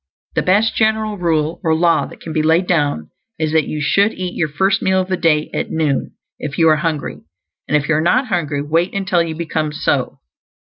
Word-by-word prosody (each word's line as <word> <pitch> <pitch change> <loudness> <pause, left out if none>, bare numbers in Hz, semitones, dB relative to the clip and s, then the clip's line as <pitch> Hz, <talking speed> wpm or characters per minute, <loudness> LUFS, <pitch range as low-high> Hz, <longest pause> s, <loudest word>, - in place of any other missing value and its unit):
The - - +1
best 205 +5 +2
general 220 -1 +1
rule 160 -2 0
or 160 -2 +2
law 170 0 +2
that - - -14
can 160 - -7
be 155 - +1
laid 160 +4 +3
down 145 - 0 0.3
is 155 -1 -1
that 160 -2 +2
you 155 - -4
should 200 +8 +2
eat 180 -1 -5
your 165 - 0
first 190 +7 +1
meal 190 0 +2
of 185 0 -2
the 185 - +1
day 155 -4 +1
at - - -2
noon, 155 -4 -1 0.2
if 140 -2 -5
you 165 - +4
are 155 - +4
hungry; 155 - -3 0.5
and 150 - +3
if 145 0 -3
you 160 - +2
are 150 - +2
not 245 - +2
hungry, 150 -6 -1
wait 165 +6 0
until 190 -3 +1
you 165 -1 -3
become 155 -2 -2
so. 150 - -1
165 Hz, 215 wpm, -18 LUFS, 150-185 Hz, 0.5 s, you